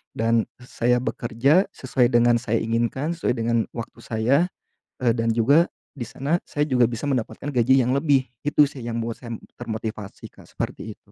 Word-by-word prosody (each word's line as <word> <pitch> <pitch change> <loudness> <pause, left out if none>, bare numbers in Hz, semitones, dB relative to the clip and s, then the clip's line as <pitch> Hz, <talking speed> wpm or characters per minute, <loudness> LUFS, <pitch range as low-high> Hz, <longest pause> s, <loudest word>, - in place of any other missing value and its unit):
dan 115 0 +2 0.2
saya 125 0 +1
bekerja 135 - +2
sesuai 125 -2 +1
dengan 120 0 +4
saya 115 -1 0
inginkan 120 +7 -1
sesuai 165 - 0
dengan 115 +1 +1 0.2
waktu 115 -1 -7
saya, 115 +5 +1 0.7
eee, 115 -2 +4
dan 115 0 0
juga 140 +9 +4 0.3
di 120 - -3
sana 150 +6 -1
saya 150 0 0
juga 125 -2 +4
bisa 120 +4 -5
mendapatkan 130 +2 -2
gaji 125 +2 +4
yang 125 - 0
lebih 140 -2 +3 0.2
gitu 145 0 +5
sih, 130 - -10
yang 115 0 -3
membuat 115 0 -4
saya 115 -1 -8 0.3
termotivasi, 110 -3 -6
Kak, - - -17
seperti - - -5
itu. - - -28
120 Hz, 175 wpm, -24 LUFS, 115-135 Hz, 0.7 s, gitu